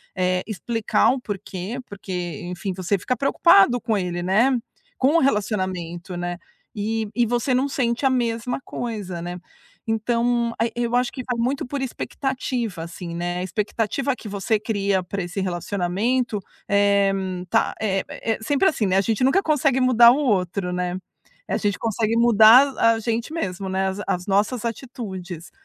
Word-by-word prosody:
eh, 185 0 +1
explicar 225 +1 +1
o 265 - -1
porquê. 205 +1 -5
Porque, 180 -6 -5
enfim, 180 +3 -4
você 185 +2 0
fica 250 +7 -2
preocupado 245 - +5
com 220 -2 0
ele, 175 -2 -2
né, 235 +8 +3 0.4
com 275 +5 +3
o - - +5
relacionamento, 185 - -1
né, 175 0 -3 0.4
e 220 +1 -2
e 240 0 +3
você 240 +3 0
não 260 +2 +2
sente 245 -2 -1
a - - +5
mesma 240 -1 -1
coisa, 205 -7 -5
né. 175 +1 -5 0.5
Então 235 +1 +1
e 230 0 +1
eu 240 0 -1
acho 250 0 +1
que 260 - -5
vai 245 -2 -2
muito 270 +6 0
por 280 +1 -3
expectativa 255 - -3
assim, 170 0 -7
né, 175 +1 -2
a 180 - -2
expectativa 225 +7 -1
que 230 - -10
você 205 +2 0
cria 200 -3 0
pra 195 +2 -4
esse 175 +4 -5
relacionamento, 195 +6 -1 0.3
eh, 200 -1 +3 0.4
tá - - +2
eh 195 -3 +1
eh, 225 -1 -3
sempre 285 +10 +2
assim, 225 -9 -1
né, 185 - +2
a - - +5
gente 220 +3 0
nunca 320 +10 +3
consegue 280 -4 +2
mudar 240 -2 +7
o 255 - +2
outro, 190 - 0
né, 180 0 -2 0.5
a - - 0
gente 205 -2 -1
consegue 225 0 0
mudar 235 +2 +8
a 230 - +5
a - - -4
gente 230 +4 -2
mesmo, 190 - -3
né, 190 0 0
as 190 +1 -5
as 180 0 -1
nossas 210 +5 +1
atitudes, 190 - -6
215 Hz, 170 wpm, -23 LUFS, 185-245 Hz, 0.5 s, mudar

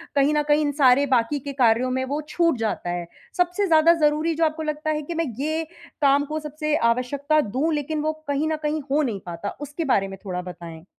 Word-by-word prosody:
कहीं 280 +1 +3
न 300 0 +2
कहीं 295 +1 +4
इन 290 -1 +1
सारे 260 +1 +6
बाकी 250 +4 +2
के 280 +1 -6
कार्यों 250 -1 +3
में 260 +1 0
वो 285 +3 -2
छूट 335 -4 +2
जाता 220 -5 -2
है। 175 -1 -3 0.3
सबसे 360 +3 +1
ज़्यादा 325 0 +6
ज़रूरी 305 +2 +1
जो 325 +1 +2
आपको 315 0 -2
लगता 305 0 -2
है 305 0 -1
कि 330 +3 -6
मैं 330 0 0
ये 315 +3 -1 0.4
काम 285 0 +4
को 310 +1 -3
सबसे 305 0 -2 0.2
आवश्यकता 285 +5 0
दूँ 275 +8 -1
लेकिन 300 +1 -2
वो 310 +1 0
कहीं 285 +2 0
न 315 - 0
कहीं 300 +1 -1
हो 295 +2 +3
नहीं 225 -7 -2
पाता। 175 +3 -5
उसके 295 +3 -4
बारे 200 -8 +2
में 195 0 -8
थोड़ा 180 -2 -3
बताएँ? 170 -2 -10
290 Hz, 225 wpm, -23 LUFS, 250-310 Hz, 0.4 s, सारे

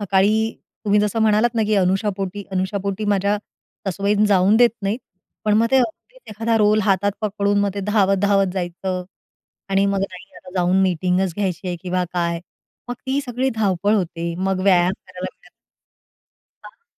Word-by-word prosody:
सकाळी 200 +1 +3 0.5
तुम्ही 205 0 +3
जसं 210 +2 0
म्हणालात 220 +2 +3
ना 225 - +2
की 215 - +2
अनुशापोटी 195 +1 0
अनुशापोटी 195 +2 -2
माझ्या 200 +1 +1 0.5
सासूबाई 200 +2 0
जाऊन 200 +2 +4
देत 240 0 +6
नाहीत. 205 +5 -1 0.5
पण 210 - +3
मग 230 - +3
ते 265 - +4
अगदीच 260 - -3
एखादा 225 +2 0
रोल 210 +1 +4
हातात 200 0 +2
पकडून 205 -1 0
मग 200 -1 +1
ते 200 - -3
धावत-धावत 195 -1 +3
जायचं. 180 0 -3 0.6
आणि 195 +1 +2
मग 195 -1 0
नाही, 190 0 -6
आता 180 - -13
जाऊन 180 0 +2
मीटिंगच 180 0 +1
घ्यायची 190 -2 -2
आहे 175 - -2
किंवा 180 0 -1
काय. 170 -1 -1 0.5
मग 245 - -2
ती 270 +2 +1
सगळी 250 +2 -1
धावपळ 205 -1 +1
होते, 170 -3 -2
मग 190 0 0
व्यायाम 180 -2 +4
करायला 185 0 -8
भेटत - - -23 1.1
हां? 465 - -15
195 Hz, 160 wpm, -21 LUFS, 185-210 Hz, 1.1 s, देत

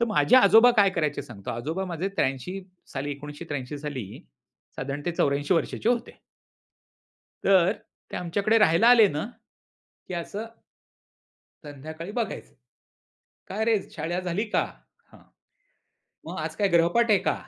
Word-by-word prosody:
तर - - +4
माझे 220 +3 +4
आजोबा 225 +1 +7
काय 200 -1 +6
करायचे 155 -5 -1
सांगतो. 100 -5 -8
आजोबा 155 +11 -3
माझे 180 +1 -3
83 135 +8 -1 0.3
साली 140 +1 -3
1983 145 -1 -6
साली 135 -9 -6 0.6
साधारणतः 145 +4 -3
84 145 +4 +2
वर्षांचे 170 +6 -1
होते. 240 0 -1 1.3
तर 190 -2 +5 0.4
ते - - -5
आमच्याकडे 200 +6 +1
राहायला 175 0 +4
आले 235 -4 +8
ना, 150 -1 -3 0.8
की - - -6
असं 200 +6 -4 1.2
संध्याकाळी 155 +5 -8
बघायचं. 230 0 -4 0.9
"काय 210 +3 -2
रे 225 -1 +3
शाळा 165 +3 -3
झाली 185 +3 -2
का? - - +2 0.5
हां, - - -17 1.0
मग - - -6
आज - - -4
काय 205 - +2
गृहपाठ 175 +7 +3
आहे 200 - +5
का?" - - 0
170 Hz, 130 wpm, -26 LUFS, 145-205 Hz, 1.3 s, आले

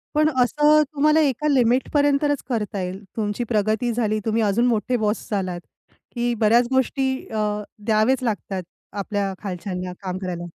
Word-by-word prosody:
पण 305 +1 +4
असं 300 +4 +4
तुम्हाला 305 +2 +3
एका 295 -1 +1
लिमिटपर्यंतच 285 +2 +2
करता 210 -5 -2
येईल. 185 +3 -5
तुमची 210 +2 -1
प्रगती 220 +1 0
झाली, 215 -2 0
तुम्ही 225 0 +1
अजून 215 +4 +2
मोठे 240 +2 +1
बॉस 215 -1 -1
झालात, 185 -3 -2 0.6
की 240 0 0
बऱ्याच 235 +3 +4
गोष्टी 265 +1 +1 0.2
अ, 210 -1 -1 0.2
द्यावेच 225 +4 +2
लागतात 200 -4 -2 0.3
आपल्या 200 -1 -2
खालच्यांना 180 -1 -4
काम 185 0 -3
करायला. 175 -2 -4
220 Hz, 140 wpm, -23 LUFS, 205-260 Hz, 0.6 s, पण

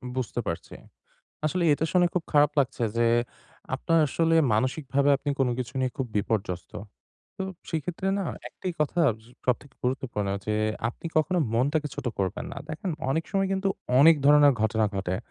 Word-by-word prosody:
বুঝতে 125 -2 -2
পারছি। 85 - -4 0.7
আসলে 175 +4 0
এটা 155 - -2
শুনে 180 -1 +5
খুব 180 - +1
খারাপ 145 0 +5
লাগছে 130 -3 0
যে, 120 - +3 0.7
আপনার 165 - +1
আসলে 165 +4 +1 0.2
মানসিকভাবে 135 +4 +1
আপনি 145 +1 -3
কোন 135 - +2
কিছু 125 -2 -4
নিয়ে 130 -1 +1
খুব 130 - -1
বিপর্যস্ত। 95 -4 -2 0.6
তো - - -3 0.3
সেক্ষেত্রে 170 +4 -2
না? 195 - -1 0.2
একটাই 185 - -5
কথা 150 +3 +1 0.5
সবথেকে 130 +2 -1
গুরুত্বপূর্ণ 125 -5 -1 0.2
যে, 105 - 0 0.3
আপনি 145 - -8
কখনো 175 +3 +2 0.2
মনটাকে 145 +5 +1
ছোট 125 - -6
করবেন 95 -1 -2
না। - - -7
দেখেন 160 +4 -4 0.2
অনেক 160 +3 0
সময় 195 -1 +1
কিন্তু, 195 0 0 0.3
অনেক 160 +4 +8
ধরণের 145 -1 +7
ঘটনা 110 0 +2
ঘটে। 95 -2 -1
140 Hz, 155 wpm, -27 LUFS, 120-165 Hz, 0.7 s, অনেক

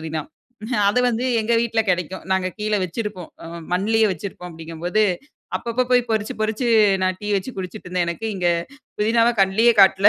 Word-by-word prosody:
புதினா. 160 -1 -3 0.7
அது 210 +5 +2
வந்து 240 +1 0 0.2
எங்க 220 +2 -1
வீட்ல்ல 225 -1 +1
கிடைக்கும். 180 0 -1
நாங்க 190 -1 +1
கீழே 210 0 0
வைச்சிருப்போம். 185 -1 -4 0.2
அ - - -7 0.3
மண்லேயே 220 +4 +2
வைச்சிருப்போம் 180 0 -7
அப்டிங்க 165 0 -9
போது, 215 +5 +2 0.5
அப்பப்போ 235 +2 -1
போய் 245 - +5
பறிச்சு 215 -1 -1
பறிச்சு 220 +3 -1 0.4
நான் 185 0 0
டீ 205 - -6
வெச்சு 195 +6 -3
குடிச்சுட்டு 185 +1 -6
இருந்தேன் 180 -1 0
எனக்கு. 195 +7 -4
இங்கே 175 -1 +2 0.5
புதினாவ 230 +2 +3
கண்லேயே 220 +5 +4
காட்டல. 195 +1 +7
200 Hz, 165 wpm, -22 LUFS, 180-225 Hz, 0.7 s, காட்டல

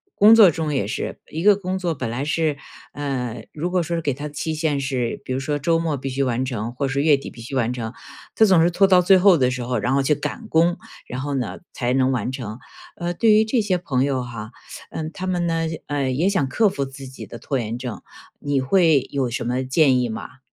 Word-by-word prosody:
工 210 +2 +7
作 205 -6 +8
中 155 -1 -2
也 115 -8 0
是， - - -4
一 160 +2 -4
个 205 0 +7
工 190 -1 -3
作 175 -3 -1
本 120 -4 -4
来 125 +5 -3
是， 150 -1 0 0.3
呃 125 -6 -4
如 170 +4 -3
果 185 - +2
说 170 +1 -2
是 165 - -2
给 145 -3 0
他 145 +3 -6
的 150 - -12
期 160 +2 -3
限 155 -2 0
是， 130 -3 -2
比 - - -7
如 130 - 0
说 145 +2 -2
周 165 +3 +1
末 160 -3 -1
必 135 0 -5
须 135 +1 -1
完 125 0 0
成 120 -2 -4
或 135 +2 -2
是 135 +1 0
月 150 0 +5
底 140 - -6
必 - - -14
须 120 +4 -7
完 120 -2 +1
成。 115 -2 -5 0.4
他 220 - +6
总 185 -5 +5
是 170 - +4
拖 190 +3 +3
到 185 -2 +5
最 190 +2 +6
后 185 -2 +6
的 125 -2 +2
时 125 -1 -3
候， 125 -1 -1
然 125 +5 0
后 140 0 +2
去 150 - +3
赶 220 - -5
工， 170 +2 +3 0.3
然 125 +1 -5
后 145 0 -3
呢 125 -5 -3
才 125 -1 -1
能 130 0 +2
完 125 0 -1
成。 115 -3 -6 0.4
呃， 175 0 -2
对 225 +5 +3
于 215 +1 +5
这 225 +1 +1
些 195 -3 0
朋 135 -7 -1
友 135 -2 0
哈， 115 -2 -8 0.4
呃， 155 -1 -4
他 185 - -5
们 175 -2 0
呢， 165 0 0 0.2
呃， 140 -3 -1
也 155 +8 +1
想 195 -8 +1
克 220 +7 +3
服 140 -7 -3
自 135 0 -8
己 130 - -9
的 120 - -10
拖 135 - -2
延 115 -1 -3
症， 125 -3 -6 0.4
你 145 -1 0
会 155 0 +3
有 135 -3 0
什 120 - -3
么 125 +2 -1
建 130 -1 +3
议 120 - -1
吗？ 130 +5 -7
140 Hz, 270 characters per minute, -22 LUFS, 130-170 Hz, 0.4 s, 作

